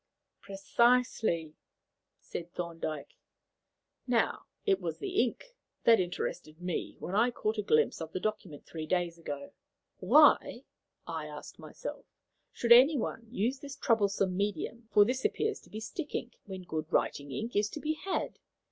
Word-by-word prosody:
"Precisely," 200 -5 +2 0.7
said 170 0 -7
Thorndyke. 165 -4 -5 0.9
"Now, 240 -2 +1 0.2
it 395 -3 +3
was - - -3
the 395 0 +1
ink - - -3 0.3
that 230 -1 +7
interested 175 -3 -3
me 180 -1 -3
when 180 - -6
I 225 +5 +4
caught 220 -2 -2
a - - +3
glimpse 155 -4 +2
of 160 0 -5
the - - -3
document 190 -8 -4
three 160 -1 -6
days 175 -1 0
ago. 145 -1 -6 0.5
'Why,' - - +5 0.4
I - - -4
asked - - -10
myself, - - -8 0.4
'should 235 - -2
anyone 245 -2 +6
use 245 +3 -1
this 280 -1 -8
troublesome 200 -4 +1
medium' 205 +4 -2
for 205 - +7
this 255 +3 -1
appears 435 0 0
to - - -20
be 215 - -6
stick 290 +8 -5
ink 240 - -3
'when 190 -2 -7
good 160 -2 -4
writing 140 -1 0
ink 225 - -4
is 205 0 +2
to 300 - -6
be 310 +1 0
had?' 375 +4 -3
205 Hz, 150 wpm, -31 LUFS, 170-245 Hz, 0.9 s, that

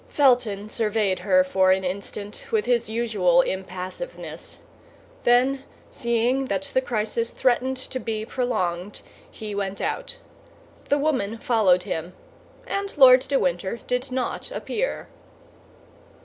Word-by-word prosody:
Felton 245 -7 +3
surveyed 215 -3 0
her 185 -1 +4
for 185 0 +3
an 190 0 +2
instant 200 +3 -5
with 440 -2 +1
his 235 -3 +1
usual 210 -7 +3
impassiveness; 190 - -6 0.7
then, 260 +3 +3 0.3
seeing 240 +3 +1
that 195 -6 -1
the 260 - +3
crisis 230 -1 -1
threatened 260 +1 +1
to 260 0 -5
be 220 -3 -3
prolonged, 195 -7 -2 0.3
he 215 -1 -7
went 200 -1 -3
out. - - -2 0.7
The 285 - +4
woman 260 -8 0
followed 210 -7 +3
him, 175 -2 -4 0.5
and 400 -6 -3
Lord 260 -2 +9
de 275 +2 0
Winter 180 +3 -1
did 250 +1 -2
not 255 -1 -2
appear. - - -3
225 Hz, 120 wpm, -24 LUFS, 190-255 Hz, 0.7 s, Lord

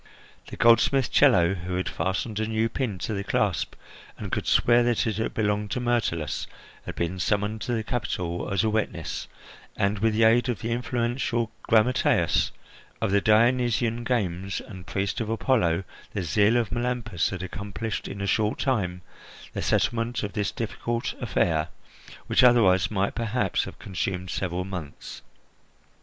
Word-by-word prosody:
The - - -8
goldsmith 120 +3 +4
Chello, 95 -11 +5
who 90 -1 -4
had 95 - -1
fastened 100 +3 -2
a 110 - -1
new 110 +1 0
pin 115 -5 -2
to 110 - -3
the 100 -1 -2
clasp, - - 0 0.4
and - - -6
could - - -2
swear 120 0 +4
that 120 -1 +1
it 110 -2 -1
had 110 - -2
belonged 105 -1 0
to 125 - -2
Myrtilus, 115 - -1 0.4
had - - -5
been 85 +2 -2
summoned 105 +3 0
to 120 - -2
the 110 -2 -1
capital 90 -7 -3
as 100 +2 +1
a 110 - +2
witness, 110 0 -2 0.5
and, 100 +1 +1
with 110 +1 +2
the 115 - +3
aid 120 +3 +4
of 120 - -2
the 115 - -3
influential 120 -1 -1
grammateus 115 +3 +3 0.5
of 110 -3 0
the 100 0 +3
Dionysian 120 +1 +2
games 100 -6 -1
and 95 -4 -11
priest 100 +5 -2
of 110 - -3
Apollo, 110 -7 +1 0.3
the 100 - -2
zeal 105 +8 +3
of 115 -4 0
Melampus 120 -6 -1
had 95 -1 -5
accomplished 100 +3 -5
in 100 - -6
a - - -1
short 105 +2 +1
time 90 -9 -1 0.5
the - - -3
settlement 115 0 0
of 100 - -4
this 105 -2 0
difficult 115 +1 -3
affair, 80 -2 +1 0.6
which - - +3
otherwise 110 -7 +5
might 100 -2 0
perhaps 115 -4 0
have - - -9
consumed 90 -1 -3
several 90 -1 -2
months. 90 -7 -7
110 Hz, 160 wpm, -26 LUFS, 95-120 Hz, 0.6 s, Chello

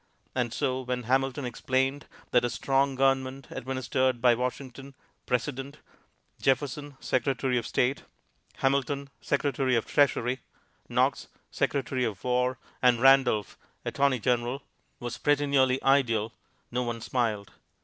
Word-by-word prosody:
And 125 -2 -1
so 130 -1 -1
when 125 -1 -3
Hamilton 135 +3 0
explained 130 +3 -1 0.2
that 125 -1 +4
a 120 - +1
strong 135 +2 +1
government 135 0 +1
administered 130 -1 -1
by 120 0 +5
Washington, 130 +2 -5 0.3
President; 135 +3 -2 0.6
Jefferson, 140 +1 0
Secretary 130 -1 0
of 115 - -6
State; 130 +3 +1 0.5
Hamilton, 140 +1 0
Secretary 135 -2 +1
of 115 - +1
the - - -13
Treasury; 130 -2 +2 0.5
Knox, - - +1 0.2
Secretary 130 -2 -1
of 110 -5 -3
War; 125 0 +1 0.2
and 125 -2 +4
Randolph, 130 -5 +4 0.3
Attorney 140 -2 +2
General, 125 +3 0 0.4
was 120 0 -5
pretty 145 0 +2
nearly 130 -2 +3
ideal, 115 -5 +2 0.4
no 125 +1 0
one 120 -1 -3
smiled. 115 -4 -1
130 Hz, 125 wpm, -28 LUFS, 125-135 Hz, 0.6 s, by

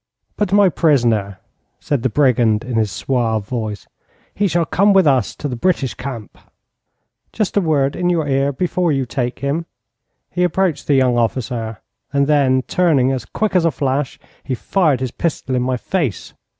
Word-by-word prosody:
'But 205 -3 -1
my 200 -1 +5
prisoner?' 120 - +1 0.4
said 145 -4 -1
the 130 - +1
brigand, 120 -4 +2
in 125 - -6
his 110 -3 +1
suave 110 0 -1
voice. 110 -5 -4 0.5
'He 205 - +1
shall 170 -1 +1
come 200 +6 +3
with 190 -2 +5
us 130 -7 +2
to 145 - -4
the 125 - -4
British 135 -1 0
camp.' 125 -5 -8 0.9
'Just 215 -5 -2
a 205 - +4
word 145 -5 +1
in 180 0 0
your 165 -4 0
ear 135 0 +1
before 175 +3 0
you 135 -2 0
take 125 0 -3
him.' 160 +4 -1 0.6
He 180 - 0
approached 180 -1 0
the 145 - +3
young 125 -2 +3
officer, 115 -2 -2 0.3
and 140 0 +2
then 135 -3 +2
turning 145 -8 +2
as 130 -5 -3
quick 215 - -2
as 180 - +4
a 165 - +3
flash, 135 -2 -2 0.3
he 130 - -2
fired 150 -2 +1
his 130 -2 -2
pistol 145 -4 -3
in 125 - +1
my 125 0 0
face. 145 - -3
135 Hz, 175 wpm, -18 LUFS, 125-165 Hz, 0.9 s, my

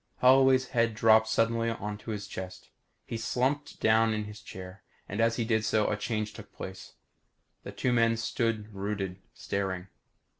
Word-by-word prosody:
Holloway's 130 0 +5
head 115 -3 +1
dropped 110 0 +5
suddenly 115 +1 +1
onto 105 -1 -5
his 105 -2 -3
chest. 95 -1 -8 0.3
He 115 - -4
slumped 130 +6 -1
down 110 0 +4
in 105 - -2
his 105 0 -9
chair. 95 -1 -10 0.3
And 100 +4 -2
as 115 0 +3
he 115 - -1
did 110 -1 +1
so, 110 -1 +2
a - - +1
change 110 0 -2
took 105 -2 -11
place. 95 0 -8 0.7
The - - -8
two 125 - 0
men 115 -1 +3
stood 110 -1 -1
rooted, 100 -2 -3 0.2
staring. 95 -1 -3
110 Hz, 160 wpm, -29 LUFS, 105-115 Hz, 0.7 s, Holloway's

